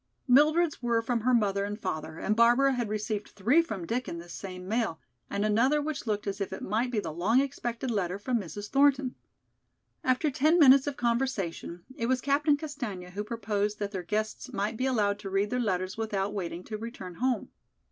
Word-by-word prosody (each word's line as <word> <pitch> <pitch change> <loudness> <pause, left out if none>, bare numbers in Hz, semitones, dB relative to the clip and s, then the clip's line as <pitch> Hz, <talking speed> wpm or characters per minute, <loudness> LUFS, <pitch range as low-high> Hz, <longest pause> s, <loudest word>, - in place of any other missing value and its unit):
Mildred's 305 +5 +4
were 235 -2 +1
from 235 0 0
her 250 +3 +2
mother 200 -3 +1
and 205 +1 -4
father 155 -4 -4
and 215 - 0
Barbara 240 +4 +5
had 240 -4 -2
received 215 0 -3
three 240 - +3
from 210 - -5
Dick 240 +6 -2
in 170 - -4
this 170 0 -9
same 185 -1 -7
mail, 220 -6 -1 0.3
and 200 +1 -1
another 235 +8 +3
which 290 -4 -4
looked 210 -1 -1
as 200 0 -3
if 195 - -2
it 190 - -6
might 225 +5 0
be 235 -3 0
the 170 -6 -4
long 205 +10 +3
expected 255 -3 -2
letter 190 -4 -1
from 235 +4 -1
Mrs. 205 +2 -6
Thornton. 275 -2 +3 0.9
After 260 +4 +2
ten 310 +5 +3
minutes 275 -3 +7
of 285 - -3
conversation, 230 -8 -1
it 230 - -2
was 260 0 +2
Captain 285 +3 +2
Castaigne 245 - -6
who 205 +3 -3
proposed 210 -2 -2
that 205 -1 -3
their 190 -3 -3
guests 215 +5 -3
might 210 +3 -2
be 255 +4 0
allowed 205 -5 +1
to 200 - -6
read 195 +2 0
their 250 - 0
letters 185 -4 -1
without 205 -2 -1
waiting 180 -3 -4
to 215 +1 -6
return 215 -5 -7
home. 250 -3 0
220 Hz, 200 wpm, -29 LUFS, 200-255 Hz, 0.9 s, minutes